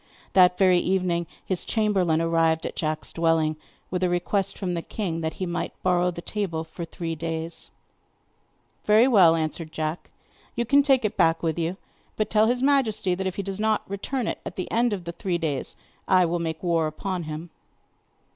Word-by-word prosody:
That 180 Hz, -1 st, +6 dB
very 185 Hz, -2 st, +5 dB
evening 180 Hz, -2 st, 0 dB, 0.2 s
his 185 Hz, -2 st, -2 dB
chamberlain 190 Hz, -7 st, +1 dB
arrived 165 Hz, -1 st, +2 dB
at -, -, -4 dB
Jack's 155 Hz, -1 st, -3 dB
dwelling, 165 Hz, -2 st, +2 dB, 0.4 s
with 180 Hz, 0 st, -1 dB
a 180 Hz, -, +2 dB
request 190 Hz, +3 st, 0 dB
from 185 Hz, -3 st, -2 dB
the 170 Hz, -, -2 dB
king 165 Hz, -4 st, -4 dB
that 160 Hz, -1 st, -2 dB
he 185 Hz, -, -3 dB
might 175 Hz, 0 st, -3 dB
borrow 180 Hz, -1 st, +3 dB
the 170 Hz, -1 st, -7 dB
table 185 Hz, -7 st, -2 dB
for 165 Hz, +1 st, -7 dB
three 165 Hz, 0 st, -5 dB
days. 165 Hz, +1 st, -5 dB, 1.2 s
'Very 215 Hz, +4 st, +6 dB
well,' 185 Hz, -10 st, +6 dB
answered 160 Hz, 0 st, -3 dB
Jack, 155 Hz, +1 st, -4 dB, 0.5 s
'you 235 Hz, -, 0 dB
can 280 Hz, +5 st, +5 dB
take 270 Hz, -4 st, +3 dB
it 210 Hz, -, -2 dB
back 165 Hz, -3 st, +3 dB
with 165 Hz, 0 st, 0 dB
you. 170 Hz, +3 st, -2 dB, 0.4 s
But 215 Hz, -, -1 dB
tell 215 Hz, 0 st, +4 dB
his 245 Hz, +2 st, 0 dB
majesty 240 Hz, -9 st, +2 dB
that 190 Hz, +1 st, -2 dB
if 190 Hz, -, -3 dB
he 200 Hz, -, -3 dB
does 195 Hz, +1 st, -5 dB
not 220 Hz, 0 st, +1 dB
return 220 Hz, +6 st, -3 dB
it -, -, -3 dB
at -, -, -7 dB
the 185 Hz, -, -5 dB
end 235 Hz, +1 st, +2 dB
of 195 Hz, -4 st, -3 dB
the 170 Hz, -, -5 dB
three 175 Hz, 0 st, -2 dB
days 155 Hz, -5 st, -3 dB, 0.3 s
I 185 Hz, -1 st, +5 dB
will 170 Hz, +1 st, -1 dB
make 160 Hz, 0 st, -4 dB
war 165 Hz, -3 st, +2 dB
upon 175 Hz, +3 st, -4 dB
him. 155 Hz, +2 st, -6 dB
180 Hz, 195 wpm, -25 LUFS, 165-200 Hz, 1.2 s, That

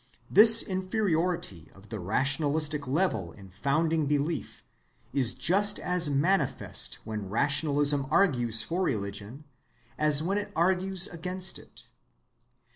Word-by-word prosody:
This 225 Hz, +2 st, +9 dB
inferiority 180 Hz, -, -2 dB
of 95 Hz, +2 st, -18 dB
the 110 Hz, -2 st, -6 dB
rationalistic 145 Hz, -, 0 dB
level 130 Hz, -, -1 dB
in 100 Hz, -2 st, -15 dB
founding 155 Hz, -, -1 dB
belief 150 Hz, +3 st, -3 dB, 0.5 s
is 130 Hz, -4 st, +2 dB
just 195 Hz, +9 st, +1 dB
as 180 Hz, -3 st, 0 dB
manifest 165 Hz, +8 st, 0 dB
when 105 Hz, -3 st, -7 dB
rationalism 145 Hz, +3 st, +1 dB
argues 120 Hz, -, +2 dB
for 175 Hz, +3 st, -4 dB
religion 105 Hz, -, -4 dB, 0.6 s
as 150 Hz, 0 st, +2 dB
when 195 Hz, +4 st, -1 dB
it 205 Hz, -, -8 dB
argues 185 Hz, +2 st, 0 dB
against 180 Hz, +1 st, -5 dB
it. -, -, -14 dB
150 Hz, 115 wpm, -27 LUFS, 125-180 Hz, 0.6 s, This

